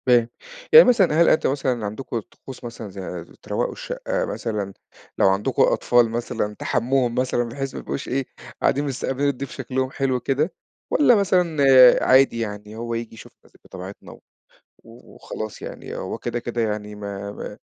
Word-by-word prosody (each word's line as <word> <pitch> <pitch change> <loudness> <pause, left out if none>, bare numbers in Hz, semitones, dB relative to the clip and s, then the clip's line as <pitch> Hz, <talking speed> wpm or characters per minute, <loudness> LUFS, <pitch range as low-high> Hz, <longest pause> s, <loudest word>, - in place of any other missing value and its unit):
فاهم، 120 -2 +4 0.4
يعني 470 - +11
مثلًا 190 -10 +4
هل 170 - +6
أنت - - +3
مثلًا 130 -5 -1
عندكم 110 +3 -4
طقوس 130 +4 -13
مثلًا 115 -3 -7
زي 90 -3 -7
ز - - -19
تروّقوا - - -2
الشقة - - -3
مثلًا، 105 - -4 0.4
لو - - +5
عندكم 95 +2 +1
أطفال 120 -2 +3
مثلًا 110 -2 -3
تحمّوهم 125 +1 0
مثلًا 125 -1 +1
بحيث 135 +3 -5
ما - - -5
يبقوش 135 - -5
إيه، 135 +1 -1 0.4
قاعدين 140 - +2
مستقبِلين 135 +1 -1
الضيف 140 -1 -5
شكلُهم 130 0 -3
حلو 135 -2 0
كده 140 +7 -1 0.4
والّا 265 -5 +5
مثلًا 180 -5 +1 0.5
عادي 130 -2 +4
يعني، 105 -1 -5
هو 115 +1 -4
ييجي 115 -1 -4
يشوف 115 - -13
مثلًا - - -23
بطبيعتنا 95 +2 -10
و - - -14 0.6
وخلاص 115 -2 -9
يعني، - - -8
هو - - -4
كده، 120 - -3
كده 120 0 -3
يعني 105 -1 -3
ما 100 -1 -6
ما - - -8
120 Hz, 165 wpm, -23 LUFS, 110-135 Hz, 0.6 s, يعني